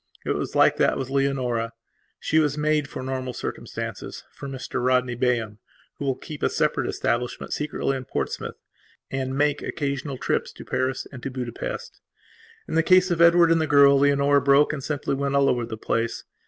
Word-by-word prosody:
It - - 0
was - - -3
like - - +5
that - - +2
with 135 -1 -4
Leonora. 130 -4 0 0.5
She 160 - +2
was 150 -2 +1
made 150 -1 +1
for 130 - -6
normal 130 -1 -3
circumstancesfor 140 - -6
Mr 130 -2 -4
Rodney 125 -1 +2
Bayham, 115 -3 -1 0.4
who 145 - -3
will 135 -2 +1
keep 150 +3 -9
a - - +2
separate - - 0
establishment, 120 +1 -2
secretly, 150 -2 -1
in 130 -1 -5
Portsmouth, - - -3 0.6
and 130 0 -2
make 145 0 +2
occasional 140 -1 -3
trips - - -1
to - - -11
Paris 130 0 -1
and 130 -3 -9
to 135 - -4
Budapest. 135 - -5 0.7
In - - -6
the 165 - +4
case 185 +2 +4
of 170 -1 +1
Edward 170 0 +6
and 165 -1 +4
the 155 - 0
girl, 140 -1 +6
Leonora 140 0 +4
broke 140 +2 +4
and 140 -3 -5
simply 145 -1 -2
went 140 0 -1
all 140 0 +4
over 120 -3 +1
the 110 -1 -6
place. 115 +1 -2
140 Hz, 180 wpm, -24 LUFS, 130-150 Hz, 0.7 s, Edward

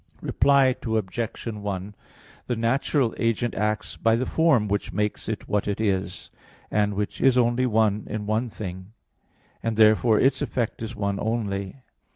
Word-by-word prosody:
Reply 135 -2 +3
Obj. 110 0 -2
1: 105 -3 -4 0.5
The 120 - 0
natural 120 +2 +1
agent 115 0 0
acts 105 +1 -2
by 115 0 +3
the 125 +3 -1
form 150 -11 +3
which 100 0 -2
makes 105 0 -2
it 110 - -4
what 105 -1 0
it 100 0 -2
is, 95 -4 -2 0.4
and 105 -1 +1
which 105 +1 -3
is 130 -1 +4
only 120 +1 +2
one 110 -2 +1
in 105 -1 -4
one 110 +3 0
thing; 95 -1 -8 0.7
and 115 -1 -2
therefore 110 0 +5
its 135 - +2
effect 120 -3 -2
is 115 +1 -5
one 100 -1 -2
only. 105 +1 -3
110 Hz, 155 wpm, -25 LUFS, 105-120 Hz, 0.7 s, therefore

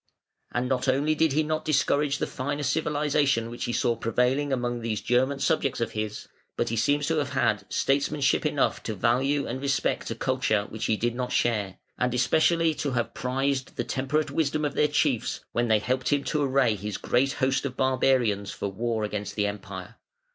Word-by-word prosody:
And 125 +1 -1
not 130 +1 0
only 140 +4 +2
did 155 -2 +2
he 155 +2 +2
not 155 +1 -2
discourage 145 -1 +1
the - - -1
finer 145 +3 -3
civilisation 145 -5 +1
which 120 - -4
he - - -2
saw 120 0 +1
prevailing 125 +5 0
among 120 -2 -1
these 110 -2 -2
German 130 +6 +1
subjects 135 -1 0
of 115 -1 -1
his, 110 -1 -4 0.3
but - - 0
he 115 - -1
seems 145 +6 +2
to 160 +1 0
have 140 -2 -3
had 110 -6 +1
statesmanship 140 -1 +1
enough - - +1
to 110 - -4
value 135 +7 +1
and 130 +3 -4
respect 140 -1 0
a - - -3
culture 105 -2 0
which 110 0 -4
he 110 - +1
did 120 +2 0
not 125 0 -3
share, 105 -5 0 0.2
and 125 -1 +1
especially 160 +6 +3
to 145 -2 -3
have 120 -2 -1
prized 135 +1 -1
the - - -1
temperate 140 +4 -1
wisdom 155 -1 0
of 145 - -1
their 150 - +3
chiefs, 145 -5 0
when 120 0 0
they 110 -1 +4
helped 130 +6 -1
him 145 -1 +2
to 150 - -1
array 135 -4 +3
his 105 0 -4
great 135 +3 +1
host 130 0 0
of 130 -2 -4
barbarians 130 -6 +2
for 100 - -4
war 110 +2 -2
against 105 -1 -4
the 105 - +1
Empire. 95 -2 -6
130 Hz, 195 wpm, -26 LUFS, 115-145 Hz, 0.3 s, they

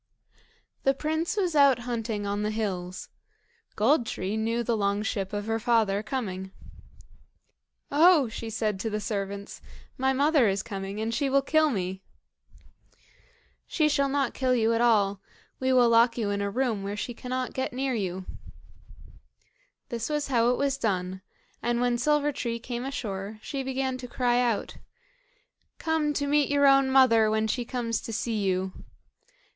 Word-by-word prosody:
The 270 0 +2
prince 315 +7 -2
was 360 -5 0
out 280 -3 +6
hunting 225 -4 -3
on 200 +1 -2
the 210 - 0
hills. 190 -4 -4 0.7
Gold 240 +3 +3
tree 190 +3 -3
knew 230 +2 -1
the 235 0 0
long 200 0 0
ship 195 -3 -2
of 205 0 -3
her 225 0 -1
father 220 -3 +2
coming. 205 -5 -4 1.4
"Oh!" 310 -1 +5
she 225 0 -6
said 215 -3 -2
to 225 - -2
the 210 0 -2
servants, 200 -1 -5 0.4
"my 265 +1 +2
mother 280 -1 +3
is 195 0 0
coming, 195 0 -5
and 225 +1 -2
she 280 +2 0
will 275 0 +3
kill 310 +2 +3
me." 190 -5 -3 1.7
"She 310 -3 +2
shall 280 -2 +1
not 275 -2 0
kill 255 -1 +1
you 230 -1 +2
at 230 - +1
all; 205 -4 +3 0.4
we 260 0 +1
will 250 -2 +5
lock 230 +1 +4
you 210 -4 -1
in 200 0 -1
a 200 - -1
room 235 -2 -1
where 200 +1 -4
she 240 - -4
cannot 255 +2 -4
get 260 - -2
near 260 +1 -2
you." 190 -4 -3 1.6
This 230 +1 -3
is 295 -2 -1
how 235 -2 +3
it 250 - +1
was 275 -1 0
done; 185 -3 -2 0.4
and 240 0 0
when 245 -1 +1
Silver 295 +2 +2
tree 235 -4 -3
came 240 +1 -5
ashore, 215 -6 -5
she 275 - -4
began 265 -1 -2
to 250 - -7
cry 245 0 +1
out: 240 -4 -1 1.0
"Come 320 -2 0
to 285 0 -1
meet 290 0 +2
your 285 0 +3
own 275 -1 +5
mother, 240 -5 +5
when 220 0 +1
she 240 +2 -1
comes 230 -2 -2
to - - -7
see 225 0 -2
you." 190 0 -1
235 Hz, 165 wpm, -27 LUFS, 205-270 Hz, 1.7 s, out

